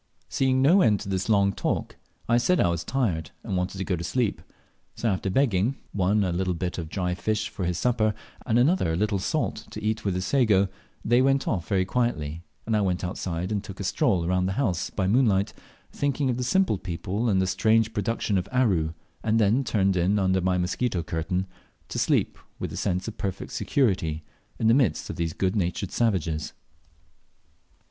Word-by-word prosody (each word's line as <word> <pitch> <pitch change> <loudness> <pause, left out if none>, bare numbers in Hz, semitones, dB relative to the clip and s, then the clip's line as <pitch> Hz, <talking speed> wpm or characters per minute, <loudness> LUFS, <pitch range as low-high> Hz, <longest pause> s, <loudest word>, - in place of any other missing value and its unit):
Seeing 130 0 +2
no 175 +8 +6
end 105 - +4
to - - -6
this 95 +1 -2
long 100 -2 +3
talk, - - -2 0.3
I 120 +1 +4
said 180 +8 +2
I - - +3
was 85 -1 -1
tired, 95 - -1
and 95 - -3
wanted 90 +1 -2
to 95 - -2
go 95 - -1
to 85 - -5
sleep; 120 +3 -1 0.5
so 120 - -2
after 95 -2 0
begging 115 0 +2 0.2
one 100 +2 +2
a 90 - 0
little 90 +1 -1
bit 90 +1 -3
of 80 -2 -5
dry 90 0 -1
fish 110 +4 -1
for 95 - -4
his 85 -1 -1
supper, 110 -3 +1 0.3
and 115 -1 +1
another 125 - +3
a - - 0
little 100 +2 0
salt 150 +10 -2
to 105 - -8
eat 110 0 -1
with 100 -3 0
his 90 0 -2
sago 105 -5 +3 0.4
they 120 +2 +4
went 135 +1 +2
off 85 -6 -1
very 95 -2 +1
quietly, 85 -9 -1 0.2
and 110 - 0
I 105 - +2
went 95 -2 0
outside 90 0 -3
and 105 -1 -1
took 100 -3 -9
a - - -3
stroll 95 - +1
round 90 +1 +1
the 95 - -1
house 95 -11 0
by 95 - -2
moonlight, 105 -2 +2 0.4
thinking 140 -1 0
of 120 - -2
the 125 - -2
simple 185 - +2
people 95 +6 -2
and 95 -3 +3
the 95 - +2
strange 110 +4 +2
productions 105 -1 0
of 90 - -6
Aru, 95 -12 +2 0.3
and 110 0 +2
then 115 +5 +3
turned 100 -5 +1
in 90 +4 +2
under 95 -1 +2
my 90 0 +1
mosquito 90 +1 -1
curtain; 85 +3 -2 0.4
to - - -3
sleep - - +1 0.2
with - - -5
a - - -5
sense 90 -1 -1
of 115 - -7
perfect 95 -2 -4
security 90 - 0 0.3
in - - -2
the 115 - +6
midst 120 - +1
of - - -7
these 85 -1 -1
good 95 +1 0
natured 90 -1 -1
savages. 85 -9 0
100 Hz, 200 wpm, -26 LUFS, 90-115 Hz, 0.5 s, no